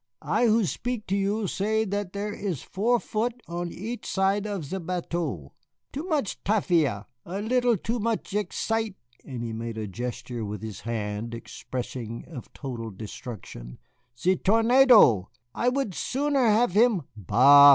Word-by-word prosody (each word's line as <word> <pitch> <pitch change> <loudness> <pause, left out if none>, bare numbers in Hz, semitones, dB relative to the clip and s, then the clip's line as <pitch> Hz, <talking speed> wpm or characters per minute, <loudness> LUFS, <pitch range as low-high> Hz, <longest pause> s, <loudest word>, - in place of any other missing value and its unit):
"I 240 - +2
who 220 -1 +4
speak 235 +5 -3
to 195 - +2
you 200 +2 0
say 220 +4 0
that 205 -2 -2
there 205 +1 -3
is 185 -10 -3
four 235 +5 +1
foot 230 +3 -2
on 175 0 -3
each 230 +6 -6
side 195 +2 +1
of 200 -7 -3
ze 190 +7 -4
bateau. 165 - -3 0.4
Too 290 +5 -4
much 305 - -1
tafia, 165 - +2 0.2
a 185 +3 -5
little 240 +1 +2
too 230 +6 -2
much 220 -2 -2
excite 220 0 -1 0.2
" - - -32
and 125 -3 -5
he 115 -1 -4
made 115 0 -5
a 110 - -2
gesture 120 +2 -5
with 105 0 -5
his 110 -4 -6
hand 110 0 -3
expressive 120 0 -6 0.2
of 140 -8 -10
total 120 -5 -5
destruction; 100 - -8 0.4
"ze 185 +6 +3
tornado, 225 - +6 0.2
I 245 - +2
would 255 -6 -1
sooner 275 - +1
have 220 0 +4
him 215 -3 +4
" - - -46
"Bah!" 140 +8 +8
190 Hz, 160 wpm, -27 LUFS, -, 0.4 s, Bah